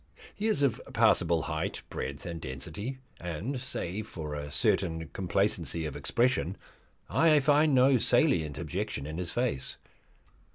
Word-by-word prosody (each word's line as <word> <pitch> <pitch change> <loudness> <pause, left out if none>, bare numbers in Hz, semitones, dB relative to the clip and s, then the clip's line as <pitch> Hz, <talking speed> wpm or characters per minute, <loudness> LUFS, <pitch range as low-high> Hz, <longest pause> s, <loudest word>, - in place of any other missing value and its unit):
He 215 - -2
is 210 -10 +2
of 135 -5 +2
passable 85 -3 +4
height, 80 -1 -3
breadth, 70 0 -5
and 85 -2 -5
density, 85 - -5 0.2
and, 90 - -4
save 110 -4 -4
for 75 -3 -6
a 75 0 -5
certain 80 +2 +1
complacency 85 -4 0
of 75 - -4
expression, 120 -6 +1 0.5
I 160 -2 +5
find 145 +1 +4
no 130 0 +5
salient 75 -8 +3
objection 85 -2 -3
in 80 +3 -5
his 90 -2 -3
face. 120 - -1
90 Hz, 135 wpm, -30 LUFS, 80-125 Hz, 0.5 s, I